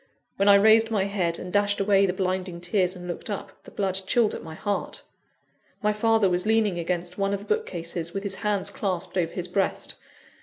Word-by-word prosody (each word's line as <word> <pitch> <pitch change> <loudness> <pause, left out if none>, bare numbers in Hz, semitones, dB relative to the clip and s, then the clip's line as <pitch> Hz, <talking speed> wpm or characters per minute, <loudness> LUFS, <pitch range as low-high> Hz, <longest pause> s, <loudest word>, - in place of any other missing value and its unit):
When 200 +1 +4
I 200 - +9
raised 220 +2 +6
my 210 -4 +1
head, 185 -4 -1
and 180 - -8
dashed 205 0 +2
away 195 0 +4
the - - +1
blinding 185 -1 -2
tears, 180 +1 +1
and 180 0 -9
looked 175 - -5
up, 205 - -4
the - - -10
blood 195 -1 -2
chilled 230 -3 +3
at - - -5
my 160 -1 -9
heart. 205 +4 -3 0.8
My 210 0 +3
father 225 -1 +3
was 180 +2 0
leaning 215 -5 +2
against 175 +2 -2
one 195 0 +1
of - - -5
the - - -11
bookcases, 170 - -5
with 195 +2 -4
his 195 -2 -2
hands 205 -3 -1
clasped 185 -3 -3
over 170 -3 0
his 180 -1 -4
breast. 195 +1 -1
195 Hz, 205 wpm, -25 LUFS, 180-205 Hz, 0.8 s, I